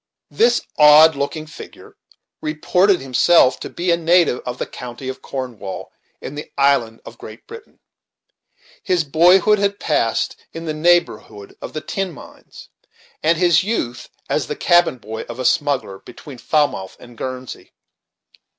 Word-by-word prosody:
This 240 Hz, +1 st, +2 dB, 0.2 s
odd 150 Hz, +1 st, +7 dB
looking 140 Hz, +3 st, -4 dB
figure 155 Hz, -, -13 dB, 0.5 s
reported 180 Hz, +5 st, +1 dB
himself 130 Hz, +1 st, +3 dB
to -, -, -7 dB
be 175 Hz, +1 st, -2 dB
a 170 Hz, -, +3 dB
native 170 Hz, -5 st, +2 dB
of 125 Hz, 0 st, -4 dB
the -, -, -3 dB
county 125 Hz, +1 st, -8 dB
of 130 Hz, -, -7 dB
Cornwall, 120 Hz, -8 st, -7 dB, 0.3 s
in -, -, -8 dB
the 150 Hz, +1 st, -9 dB
island 140 Hz, -5 st, +1 dB
of 115 Hz, -, -12 dB
Great 110 Hz, +2 st, -12 dB
Britain. 455 Hz, -1 st, -13 dB, 1.0 s
His 180 Hz, -2 st, 0 dB
boyhood 180 Hz, +8 st, +4 dB
had 200 Hz, +1 st, -1 dB
passed -, -, -1 dB, 0.2 s
in 165 Hz, 0 st, -7 dB
the 155 Hz, -, -3 dB
neighborhood 155 Hz, -11 st, 0 dB
of -, -, -8 dB
the 155 Hz, -, -4 dB
tin 195 Hz, +2 st, -4 dB
mines, -, -, -15 dB, 0.5 s
and 165 Hz, +1 st, +2 dB
his 175 Hz, 0 st, +3 dB
youth 155 Hz, -, -3 dB, 0.2 s
as -, -, -1 dB
the -, -, -4 dB
cabin 175 Hz, -6 st, +3 dB
boy 110 Hz, -1 st, -7 dB
of 120 Hz, -, -7 dB
a 130 Hz, -, -4 dB
smuggler, 130 Hz, -9 st, 0 dB
between 130 Hz, +6 st, -13 dB
Falmouth 145 Hz, -12 st, -1 dB
and 120 Hz, -1 st, -15 dB
Guernsey. 130 Hz, +1 st, -7 dB
150 Hz, 150 wpm, -19 LUFS, 125-175 Hz, 1.0 s, odd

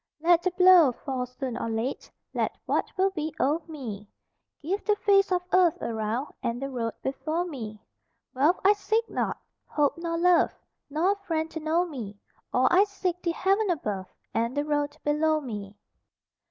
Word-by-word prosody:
Let 340 Hz, +2 st, +4 dB
the 370 Hz, -, +1 dB
blow 360 Hz, -5 st, +7 dB
fall 255 Hz, 0 st, -4 dB
soon 250 Hz, -1 st, -5 dB
or 230 Hz, -, -3 dB
late, 225 Hz, +4 st, -3 dB, 0.2 s
Let -, -, -1 dB
what -, -, 0 dB
will 385 Hz, +1 st, +3 dB
be 315 Hz, -4 st, -4 dB
o'er 300 Hz, +5 st, +2 dB
me; 230 Hz, -10 st, -7 dB, 0.6 s
Give 380 Hz, +7 st, -2 dB
the 420 Hz, -, +2 dB
face 395 Hz, -2 st, +3 dB
of 360 Hz, -1 st, +1 dB
earth 360 Hz, -3 st, +4 dB
around 225 Hz, +4 st, -3 dB
And 235 Hz, +1 st, -2 dB
the 275 Hz, +1 st, -4 dB
road 230 Hz, -3 st, -3 dB
before 310 Hz, +6 st, -2 dB
me. 225 Hz, -10 st, -7 dB, 0.5 s
Wealth 295 Hz, +7 st, +3 dB
I 405 Hz, -, +8 dB
seek 435 Hz, +3 st, 0 dB
not, -, -, -1 dB, 0.3 s
hope 295 Hz, +2 st, +1 dB
nor 335 Hz, -1 st, -2 dB
love, 350 Hz, 0 st, +4 dB, 0.4 s
Nor 320 Hz, +7 st, +2 dB
a -, -, +1 dB
friend 325 Hz, -5 st, -2 dB
to 320 Hz, -, -5 dB
know 320 Hz, +3 st, +1 dB
me; 235 Hz, -, -7 dB, 0.3 s
All 255 Hz, +1 st, +3 dB
I 385 Hz, +3 st, +6 dB
seek, 370 Hz, -3 st, -3 dB
the 345 Hz, -, -1 dB
heaven 390 Hz, +4 st, +1 dB
above 210 Hz, -, -2 dB, 0.3 s
And 235 Hz, +4 st, -1 dB
the 290 Hz, -, +1 dB
road 290 Hz, -1 st, -1 dB
below 310 Hz, +1 st, +2 dB
me. 210 Hz, -7 st, -7 dB
310 Hz, 175 wpm, -27 LUFS, 250-360 Hz, 0.6 s, I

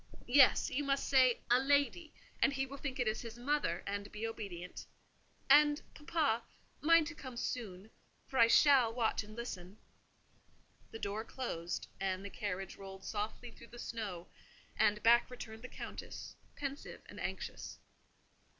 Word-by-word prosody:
"Yes, 265 Hz, +2 st, +5 dB
you 290 Hz, -, 0 dB
must 275 Hz, -1 st, 0 dB
say 255 Hz, -3 st, +5 dB
a 245 Hz, -, +7 dB
lady; 285 Hz, +4 st, +2 dB, 0.3 s
and 275 Hz, -, +4 dB
he 270 Hz, 0 st, 0 dB
will 275 Hz, +1 st, -9 dB
think 265 Hz, -2 st, -4 dB
it 245 Hz, -, +1 dB
is 215 Hz, 0 st, 0 dB
his 230 Hz, -1 st, -8 dB
mother, 250 Hz, -, 0 dB
and 200 Hz, 0 st, -4 dB
be 215 Hz, +1 st, -4 dB
obedient. 195 Hz, -6 st, -6 dB, 0.6 s
And, 295 Hz, +1 st, +6 dB
papa, 295 Hz, -7 st, 0 dB, 0.4 s
mind 330 Hz, +1 st, +6 dB
to 335 Hz, -, -5 dB
come 260 Hz, -5 st, -9 dB
soon, 215 Hz, -4 st, -4 dB, 0.3 s
for 265 Hz, -, -2 dB
I 230 Hz, -, +8 dB
shall 260 Hz, -2 st, +6 dB
watch 225 Hz, -2 st, 0 dB
and 215 Hz, +1 st, -12 dB
listen." 200 Hz, -5 st, -6 dB, 1.1 s
The 225 Hz, -, -7 dB
door 210 Hz, 0 st, -3 dB
closed, 175 Hz, -10 st, -4 dB
and 190 Hz, 0 st, -2 dB
the 200 Hz, -, -6 dB
carriage 195 Hz, -2 st, -4 dB
rolled 190 Hz, -1 st, -10 dB
softly 220 Hz, +4 st, -4 dB
through -, -, -14 dB
the 240 Hz, -, -13 dB
snow; 210 Hz, -8 st, -5 dB, 0.5 s
and 210 Hz, 0 st, +2 dB
back 235 Hz, +1 st, +6 dB
returned 225 Hz, -3 st, -8 dB
the 255 Hz, -, -7 dB
Countess, -, -, -8 dB, 0.2 s
pensive 280 Hz, 0 st, -6 dB
and -, -, -11 dB
anxious. -, -, -5 dB
235 Hz, 155 wpm, -35 LUFS, 205-275 Hz, 1.1 s, I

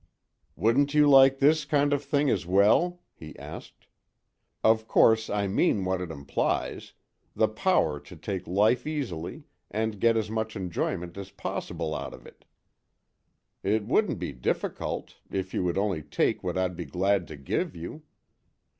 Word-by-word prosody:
"Wouldn't 140 Hz, +6 st, +2 dB
you 150 Hz, -1 st, +6 dB
like 135 Hz, -1 st, +7 dB
this 150 Hz, +3 st, +4 dB
kind 145 Hz, -1 st, +2 dB
of 145 Hz, 0 st, 0 dB
thing 145 Hz, +1 st, +1 dB
as 95 Hz, -, 0 dB
well?" 110 Hz, -, +3 dB
he 80 Hz, -1 st, -11 dB
asked. -, -, -10 dB, 0.8 s
"Of 110 Hz, 0 st, +3 dB
course, 110 Hz, -1 st, +4 dB
I 100 Hz, 0 st, 0 dB
mean 95 Hz, 0 st, +1 dB
what 95 Hz, 0 st, -1 dB
it 90 Hz, -, -5 dB
implies 70 Hz, -3 st, -2 dB, 0.4 s
the 110 Hz, -, +3 dB
power 110 Hz, -, +1 dB
to 75 Hz, +5 st, -13 dB
take 95 Hz, +3 st, -5 dB
life 110 Hz, -, +2 dB
easily 135 Hz, -, -4 dB, 0.3 s
and 110 Hz, -1 st, -2 dB
get 115 Hz, +1 st, +4 dB
as 110 Hz, -1 st, -2 dB
much 110 Hz, 0 st, -2 dB
enjoyment 90 Hz, -1 st, -3 dB
as 100 Hz, -1 st, -7 dB
possible 80 Hz, -4 st, -4 dB
out 70 Hz, -2 st, -5 dB
of -, -, -17 dB
it. -, -, -16 dB, 1.2 s
It 105 Hz, +1 st, 0 dB
wouldn't 150 Hz, -, +1 dB
be 90 Hz, -3 st, -4 dB
difficult, 60 Hz, -2 st, -3 dB
if 95 Hz, -1 st, -4 dB
you -, -, 0 dB
would 85 Hz, 0 st, -1 dB
only 100 Hz, -5 st, 0 dB
take -, -, 0 dB
what -, -, -2 dB
I'd 90 Hz, -1 st, 0 dB
be 85 Hz, 0 st, -5 dB
glad 95 Hz, 0 st, 0 dB
to 80 Hz, -, -9 dB
give 70 Hz, +5 st, -2 dB
you." 85 Hz, -, -7 dB
100 Hz, 160 wpm, -27 LUFS, 90-130 Hz, 1.2 s, like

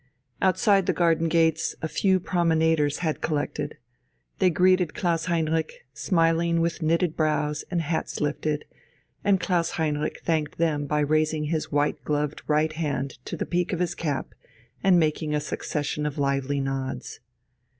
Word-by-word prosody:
Outside 195 Hz, +1 st, +3 dB
the -, -, +3 dB
garden 165 Hz, -1 st, +3 dB
gates 160 Hz, -1 st, +2 dB
a 160 Hz, -, -2 dB
few 190 Hz, +5 st, +2 dB
promenaders 160 Hz, -4 st, +1 dB
had 155 Hz, -, -1 dB
collected. 150 Hz, -2 st, -2 dB, 0.6 s
They 185 Hz, -, +5 dB
greeted 180 Hz, -1 st, +3 dB
Klaus 165 Hz, -3 st, 0 dB
Heinrich, 160 Hz, -4 st, -1 dB
smiling 165 Hz, +2 st, +2 dB
with 170 Hz, +1 st, -1 dB
knitted 165 Hz, +1 st, +1 dB
brows 150 Hz, -1 st, 0 dB
and 175 Hz, -2 st, 0 dB
hats 160 Hz, +1 st, -2 dB
lifted, 150 Hz, 0 st, -1 dB, 0.6 s
and 200 Hz, -1 st, +3 dB
Klaus 170 Hz, -1 st, +1 dB
Heinrich 150 Hz, -2 st, -1 dB
thanked 155 Hz, -3 st, -1 dB
them 150 Hz, -3 st, 0 dB
by 150 Hz, +1 st, +1 dB
raising 155 Hz, +1 st, +1 dB
his 155 Hz, +1 st, -2 dB
white 145 Hz, 0 st, 0 dB
gloved 150 Hz, 0 st, -1 dB
right 155 Hz, +1 st, +2 dB
hand 145 Hz, -5 st, -3 dB
to -, -, -5 dB
the -, -, -2 dB
peak 180 Hz, +1 st, -1 dB
of 175 Hz, -, -2 dB
his 175 Hz, -1 st, 0 dB
cap 145 Hz, -6 st, -3 dB, 0.5 s
and 190 Hz, -2 st, +5 dB
making 155 Hz, -1 st, 0 dB
a -, -, +2 dB
succession 150 Hz, 0 st, -3 dB
of 145 Hz, -, -5 dB
lively 140 Hz, 0 st, 0 dB
nods. 135 Hz, -1 st, -4 dB
160 Hz, 150 wpm, -25 LUFS, 150-170 Hz, 0.6 s, They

